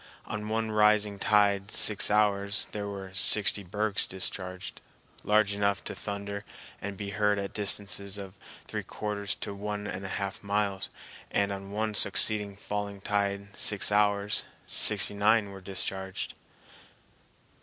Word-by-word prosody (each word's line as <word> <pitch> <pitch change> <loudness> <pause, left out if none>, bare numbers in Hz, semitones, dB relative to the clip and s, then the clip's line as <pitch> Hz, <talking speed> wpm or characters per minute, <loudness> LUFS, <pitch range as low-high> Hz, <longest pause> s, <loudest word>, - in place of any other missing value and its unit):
On 105 0 -5
one 110 0 -1
rising 105 -1 +3
tide, 100 -1 +2
six 105 -1 +6
hours, 100 -1 +1
there 105 -1 -4
were 100 -2 -7
sixty 100 +1 +4
bergs 105 +2 -2
discharged, 95 0 -4 0.4
large 105 -1 +3
enough 100 -1 0
to - - -4
thunder 100 0 -5 0.4
and 100 -1 -5
be 100 0 -5
heard 105 0 +1
at 100 0 -4
distances 100 -1 0
of 95 -2 -8
from 100 - -28 0.2
three - - -4
quarters 105 -1 -4
to - - -6
one 105 +1 -5
and 95 -1 -5
a - - -5
half 100 -1 -4
miles; 100 -1 -1 0.4
and 100 0 0
on 100 0 -6
one 110 +1 -2
succeeding 105 -1 +4
falling 100 0 -5
tide, 100 0 -2
six 105 0 +4
hours, 105 0 +2 0.2
sixty - - +2
nine 105 0 +2
were 95 -1 -10
discharged. 95 0 -4
100 Hz, 145 wpm, -28 LUFS, 100-105 Hz, 0.4 s, six